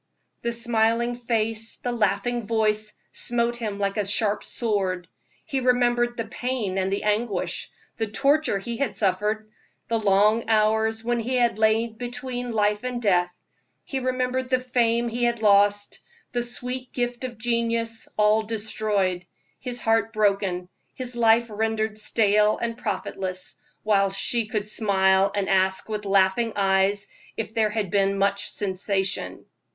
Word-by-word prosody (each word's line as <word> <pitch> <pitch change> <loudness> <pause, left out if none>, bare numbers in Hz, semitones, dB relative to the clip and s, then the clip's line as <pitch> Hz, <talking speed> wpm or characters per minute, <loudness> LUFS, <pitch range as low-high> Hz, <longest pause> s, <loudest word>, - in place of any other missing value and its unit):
The 235 - -1
smiling 230 0 +1
face, 225 -2 -1
the 245 - -3
laughing 230 +1 0
voice, 215 -1 +1 0.2
smote 240 0 0
him 215 -4 -4
like 200 0 -1
a 205 -2 0
sharp 205 0 +1
sword. 195 -6 -1 0.4
He 270 - -1
remembered 240 -1 +2
the 230 - -2
pain 225 -4 -2
and 190 0 -1
the 200 - -1
anguish, 210 +1 -1 0.3
the 225 - -1
torture 275 +4 +2
he 230 +4 -5
had 280 0 -1
suffered, 210 +2 0 0.5
the 230 -1 +1
long 210 +2 +3
hours 220 +1 +2
when 240 0 0
he 245 +3 -2
had 240 -3 +2
lain 220 +1 +2
between 245 0 -4
life 210 0 +1
and 250 -1 -3
death; 180 -6 +2 0.5
he 270 - -3
remembered 255 0 -1
the 255 -1 +3
fame 240 -2 +1
he 240 +1 -2
had 235 -1 0
lost, 205 0 +3 0.3
the 240 - 0
sweet 250 +1 -4
gift 245 0 -2
of 245 -3 -5
genius, 230 0 -1
all 210 +1 +4
destroyed; 210 -4 -1 0.4
his 245 -2 -4
heart 225 0 +1
broken, 195 -4 +1 0.3
his 250 -1 -3
life 230 0 +4
rendered 220 0 -1
stale 210 -1 +3
and 230 -1 -3
profitless, 190 -4 -3 0.3
while 200 -2 +3
she 210 +4 0
could 210 -1 -2
smile 195 -2 +3
and 200 -1 0
ask 190 0 +2
with 210 -1 -3
laughing 195 +3 +2
eyes 195 0 +2 0.3
if 220 -1 -4
there 220 -2 +2
had 210 -4 -2
been 195 -1 +2
much 200 0 0
sensation. 195 0 -2
220 Hz, 145 wpm, -24 LUFS, 200-240 Hz, 0.5 s, all